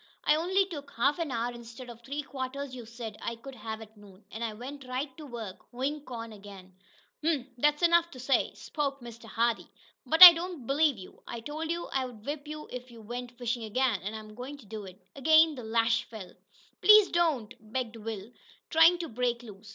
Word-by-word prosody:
I 300 - +4
only 370 +5 +2
took 290 -7 -8
half 280 +8 +2
an 330 -3 -1
hour, 240 -1 -1
instead 235 +1 -10
of 235 -1 -11
three 280 +5 -4
quarters 275 0 -5
you 245 -3 -8
said 230 -2 -8
I 235 - -3
could 265 +4 -11
have 220 -2 -6
at 220 0 -12
noon, 205 -1 -17
and 225 - -5
I 225 - -1
went 260 +4 -9
right 260 +2 -3
to 305 -2 -9
work 225 -7 -7
hoein' 275 +4 -3
corn 230 -3 -7
again." 195 -2 -12 0.5
"Humph! 305 -5 +1
That's 295 +6 +2
easy - - +8
enough 340 0 +4
to 260 - -12
say," 260 +2 +1
spoke 280 -3 -3
Mr. 235 -1 -11
Hardee, 230 +1 0 0.3
"but 320 +3 +7
I 350 -1 +15
don't 335 -5 -5
believe 285 0 +2
you. 185 - -12
I 235 - -5
told 305 +7 -5
you 340 +1 -2
I'd 250 -5 -3
whip 290 0 -4
you 305 0 -7
if 250 0 -7
you 235 -1 -13
went 240 +2 -7
fishin' 240 -1 -2
ag'in, 225 -2 0
an' 205 +4 -5
I'm 215 -1 -9
goin' 255 +6 -7
to 270 - -16
do 210 0 -7
it!" 190 +1 -12 0.2
Again 315 +3 +5
the 250 -4 -8
lash 225 +1 +2
fell. 200 -6 -10 0.5
"Please 425 +1 +8
don't!" 315 -11 +1 0.2
begged 240 -2 -2
Will, 220 -1 -6 0.4
trying 325 +2 +7
to 340 -1 -4
break 240 0 -1
loose. 205 -2 -12
250 Hz, 210 wpm, -29 LUFS, 225-295 Hz, 0.5 s, I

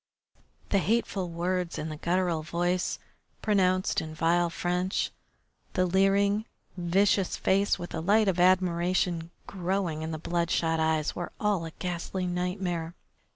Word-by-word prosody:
The 200 - +3
hateful 200 -3 0
words 175 +1 -2
in 155 - -3
the 155 - -5
guttural 170 0 0
voice, 175 +3 -1 0.5
pronounced 185 -3 +2
in 155 -1 -7
vile 170 +2 +2
French, 180 +2 -1 0.6
the 185 - +2
leering, 200 +3 +3 0.3
vicious 190 +2 +2
face 195 +2 +2
with 175 - -7
the 160 - -3
light 210 +5 +3
of 185 -2 +1
admiration 180 -2 +2 0.2
growing 180 -4 -2
in 160 - -3
the 160 - -3
bloodshot 165 0 0
eyes, 160 -1 +1
were 175 - -4
all 205 -5 +1
a 165 - -6
ghastly 180 +1 -3
nightmare. 180 -1 -2
180 Hz, 135 wpm, -28 LUFS, 170-190 Hz, 0.6 s, The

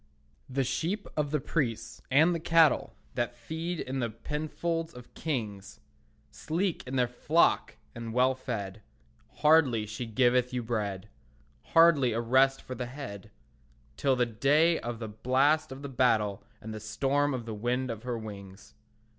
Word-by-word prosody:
The 135 +1 0
sheep 180 - -2
of 150 -2 0
the 150 +1 0
priests, 125 -5 -2
and 155 +6 +5
the 170 - -2
cattle 165 -1 +3 0.2
That 120 -1 -2
feed 160 +8 -5
in 130 +1 -3
the 120 -2 -1
penfolds 155 +7 -3
of 125 -1 -13
kings, 105 -10 -4 0.5
Sleek 175 +3 -2
is 130 - -4
their 125 -2 +3
flock 150 +7 +2 0.2
and 115 -1 -6
well 125 +3 +3
fed; 110 -6 -5 0.6
Hardly 140 -8 +5
she 115 +3 -6
giveth 125 +2 +2
you 125 - -1
bread, 105 -4 -3 0.7
Hardly 160 -8 +6
a 115 - -1
rest 130 +3 +3
for 130 - -6
the 125 0 -4
head, 120 -6 -8 0.7
Till 135 - +2
the 125 -1 +2
day 145 +8 +3
of 120 0 -5
the 110 -1 -5
blast 130 +8 +1
of 135 +2 -8
the - - -4
battle 115 -6 +1 0.2
And 110 +1 -7
the 110 - -6
storm 135 +6 0
of 120 -3 -5
the 115 - -5
wind 120 +4 -1
of 110 -1 -6
her 125 -1 -3
wings. 100 -3 -10
125 Hz, 160 wpm, -29 LUFS, 115-145 Hz, 0.7 s, Hardly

